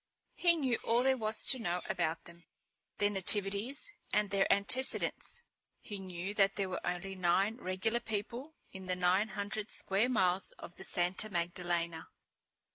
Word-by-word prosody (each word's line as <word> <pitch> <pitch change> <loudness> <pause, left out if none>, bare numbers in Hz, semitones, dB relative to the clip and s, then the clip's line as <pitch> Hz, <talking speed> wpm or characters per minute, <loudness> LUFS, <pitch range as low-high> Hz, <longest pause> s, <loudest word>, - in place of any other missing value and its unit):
He 345 -1 +5
knew 260 -7 0
all 235 +2 +2
there 265 0 +4
was 220 -3 -1
to 260 - +5
know 180 -5 -2
about 170 -3 -1
them, 170 0 -15 0.5
their 205 0 +2
nativities 205 - -1 0.2
and 210 -1 +1
their 195 -1 +2
antecedents. 260 - +2 0.4
He 205 -2 -7
knew 185 +1 -5
that 195 -2 +3
there 195 -2 -1
were 185 - -3
only 180 +2 -3
nine 190 +4 +2
regular 200 +3 -1
people 235 +8 -5 0.2
in 190 -1 -9
the 180 - 0
nine 180 +4 +3
hundred 205 +2 -4
square 200 +6 +1
miles 190 -5 +1
of 175 - -11
the - - -9
Santa 180 +4 -1
Magdalena. 170 -2 -2
195 Hz, 155 wpm, -33 LUFS, 180-220 Hz, 0.5 s, He